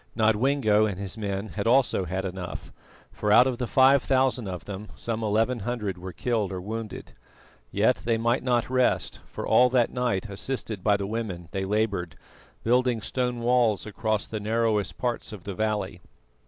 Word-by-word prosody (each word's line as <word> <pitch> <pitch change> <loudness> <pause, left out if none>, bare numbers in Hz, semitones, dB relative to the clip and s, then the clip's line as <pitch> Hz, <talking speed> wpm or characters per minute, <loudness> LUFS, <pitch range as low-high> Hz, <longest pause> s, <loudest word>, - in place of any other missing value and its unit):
Nodwengo 110 -1 +3
and 100 -4 -4
his 100 -1 -3
men 100 -1 -3
had 105 +1 -3
also 120 -6 +3
had 95 +3 -3
enough, 90 -1 -6 0.4
for 105 - -1
out 120 +4 +8
of 130 -2 -1
the 125 - -1
five 135 +3 +5
thousand 130 -4 +1
of 90 -3 -6
them 100 +1 -7
some 115 -1 -3
eleven 115 +3 +1
hundred 105 -3 -3
were 95 +1 -6
killed 110 -2 -1
or 95 - -4
wounded. 110 +3 -6 0.6
Yet 110 +5 +3
they 115 -1 0
might 120 +3 +1
not 125 -2 +1
rest, 130 0 +1
for - - -6
all 125 0 +5
that 125 -2 +2
night, 120 -5 -1
assisted 105 -1 -4
by 105 -1 +4
the 100 - -3
women, 100 -6 -4
they 95 0 -2
laboured, 100 -4 -1 0.5
building 125 0 +2
stone 125 +2 -2
walls 120 -3 +2
across 110 0 -1
the 110 - -5
narrowest 110 -2 0
parts 120 -2 -2
of 105 -5 -9
the 100 - -5
valley. 110 +1 -2
110 Hz, 175 wpm, -26 LUFS, 100-120 Hz, 0.6 s, out